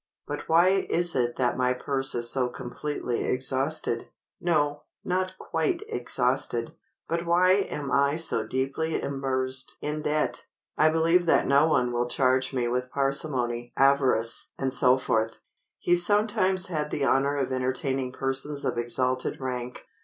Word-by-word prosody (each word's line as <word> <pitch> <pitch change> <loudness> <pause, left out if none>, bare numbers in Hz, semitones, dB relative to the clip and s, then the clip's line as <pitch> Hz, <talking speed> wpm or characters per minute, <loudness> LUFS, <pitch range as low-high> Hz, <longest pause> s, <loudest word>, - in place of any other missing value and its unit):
But - - -6
why 185 +4 +4
is 175 0 +2
it 120 -1 0
that 125 -2 0
my 125 0 +1
purse 135 +1 -1
is 120 0 0
so 125 +1 +1
completely 125 0 -4
exhausted—no, 145 +3 -1 0.2
not 185 +1 -2
quite 160 -3 -2
exhausted; 125 -1 0 0.3
but 170 +1 -1
why 180 +2 +4
am 150 -8 -1
I 140 +2 +2
so 165 +1 +1
deeply 140 +5 -2
immersed 130 -1 -2
in 150 +1 -3
debt? 150 -5 -1 0.3
I 155 - +4
believe 165 +2 +2
that - - +4
no 140 +3 +4
one 125 -6 +1
will 120 0 0
charge 130 0 +1
me 125 -3 -1
with 125 +1 -2
parsimony, 125 -4 -1
avarice," 135 -4 +3 0.2
&c. 130 -1 +2 0.9
He 175 - +2
sometimes 190 0 +2
had 155 -4 -3
the 140 - -1
honor 140 +1 +2
of 135 -2 -2
entertaining 130 0 -1
persons 135 +3 -2
of - - -1
exalted 125 +2 -1
rank. 125 -2 -5
135 Hz, 140 wpm, -26 LUFS, 125-155 Hz, 0.9 s, why